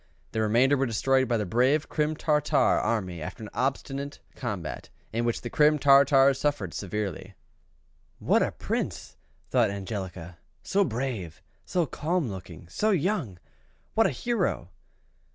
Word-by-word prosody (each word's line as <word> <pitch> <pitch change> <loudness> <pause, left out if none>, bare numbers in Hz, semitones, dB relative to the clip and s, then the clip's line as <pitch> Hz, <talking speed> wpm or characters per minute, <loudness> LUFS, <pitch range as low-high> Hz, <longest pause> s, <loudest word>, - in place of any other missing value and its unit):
The 110 - -1
remainder 120 +6 +4
were 135 -1 +1
destroyed 130 +4 +2
by 120 -1 +1
the 105 - -1
brave 130 - +2
Crim 155 0 0
Tartar 150 -2 +1
army 90 -7 +1
after 110 +8 -7
an 105 - -8
obstinate 135 +1 -2 0.2
combat, - - -5 0.2
in 115 +1 0
which 120 - -1
the 120 - -5
Crim 150 0 +4
Tartars 140 -1 +5
suffered 140 - -1
severely." 100 -2 -4 0.8
"What - - +2
a - - +1
Prince!" - - -4 0.4
thought 120 -4 +3
Angelica: 95 -4 -6 0.2
"so 200 +1 +2
brave 115 - -4 0.2
so 175 -2 0
calm 155 -1 -1
looking 90 -4 -9
so 210 - 0
young 170 - 0 0.6
what 225 - +4
a - - 0
hero!" 240 -1 -1
130 Hz, 140 wpm, -27 LUFS, 105-150 Hz, 0.8 s, Tartars